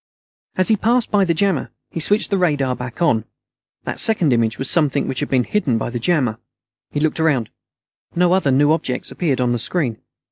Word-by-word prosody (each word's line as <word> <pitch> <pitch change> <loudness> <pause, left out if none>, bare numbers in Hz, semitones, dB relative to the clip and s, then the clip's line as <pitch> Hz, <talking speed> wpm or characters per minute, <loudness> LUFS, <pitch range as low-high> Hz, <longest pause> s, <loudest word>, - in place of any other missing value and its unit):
As 185 +2 +4
he 220 - +5
passed 235 +3 +1
by 200 -2 +3
the 170 - +1
jammer, 190 -4 0 0.2
he - - -4
switched 205 +7 +2
the 200 - +2
radar 145 -7 +1
back 125 +6 -5
on. 115 -10 +2 0.6
That - - -3
second 180 - +3
image 115 -2 0
was 135 - -3
something 150 -5 +1
which 130 - -2
had - - -3
been 130 -2 +2
hidden 140 - 0
by 115 - -3
the 120 - -3
jammer. 125 -6 0 0.5
He 145 - -3
looked 155 +1 0
around. 140 -9 +1 0.6
No 175 +1 +3
other 185 -7 +2
new 145 +3 +3
objects 135 -6 -2
appeared 145 -8 -1
on 125 -1 +1
the 120 - -1
screen. 125 -4 -2
150 Hz, 205 wpm, -19 LUFS, 125-180 Hz, 0.6 s, he